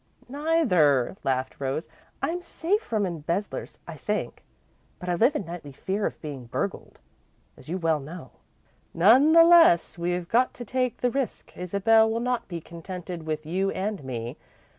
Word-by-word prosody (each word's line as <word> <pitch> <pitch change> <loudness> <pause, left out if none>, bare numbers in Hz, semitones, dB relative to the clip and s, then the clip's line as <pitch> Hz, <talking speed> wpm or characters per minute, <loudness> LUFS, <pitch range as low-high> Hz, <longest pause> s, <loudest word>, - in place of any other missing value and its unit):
"Neither," 245 - +2
laughed 130 -1 -1
Rose. 135 +4 -2 0.4
"I'm 350 +2 -1
safe 360 +4 -1
from 215 - -1
embezzlers, 170 +3 -4
I - - -6
think, - - -3 0.5
but 180 - -6
I - - +2
live 235 +11 +3
in 200 - -2
nightly 170 -4 -8
fear 195 +9 -2
of - - -8
being 140 -5 -7
burgled, - - -4 0.6
as 130 - -15
you 180 - -1
well 165 -3 +1
know." 150 0 -9 0.6
"None 245 - +6
the 330 0 +9
less, 330 - +5
we've 175 0 -2
got 245 +6 +2
to 240 - -7
take 255 +1 -1
the 245 - +2
risk. 270 -4 -4
Isabel 200 +5 +3
will 225 +1 -1
not 245 0 -1
be 170 -3 -5
contented 170 0 -8
with 155 0 -3
you 190 +5 0
and 195 -4 -3
me. 120 0 -5
180 Hz, 160 wpm, -26 LUFS, 160-240 Hz, 0.6 s, the